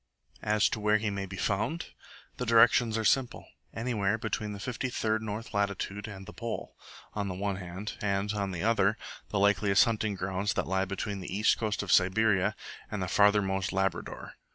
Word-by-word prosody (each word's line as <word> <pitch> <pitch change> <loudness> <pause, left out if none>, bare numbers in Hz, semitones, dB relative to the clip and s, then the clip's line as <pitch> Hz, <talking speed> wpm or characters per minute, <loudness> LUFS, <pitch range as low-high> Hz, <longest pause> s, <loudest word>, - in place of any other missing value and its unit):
As 105 0 +3
to - - -3
where 105 0 +3
he 105 -1 -2
may 100 -1 -3
be 95 +1 -8
found? 110 - -1 0.5
The 125 - -2
directions 115 0 +5
are 110 - -1
simple: 130 +2 +1 0.3
anywhere 110 -3 0
between 105 -1 -3
53 115 -1 -1
north 110 +1 -5
latitude 100 0 -2
and 95 -2 -8
the 105 - -10
Pole, 115 -1 -5 0.4
on 100 -1 -2
the 90 - -4
one 100 0 -2
hand; 95 +3 -6
and, 100 0 0
on 100 -2 -1
the 90 -2 -4
other, 110 -1 +3 0.3
the 105 - -1
likeliest 100 0 +4
hunting 110 -3 -1
grounds 95 +2 -1
that - - -1
lie 95 +1 0
between 100 +1 -4
the 90 - -7
east 105 +3 +2
coast 105 -3 -1
of - - -3
Siberia 95 +1 +3 0.3
and 105 -3 -3
farthermost 100 -2 +3
Labrador. 95 -2 -2
105 Hz, 175 wpm, -29 LUFS, 95-110 Hz, 0.5 s, directions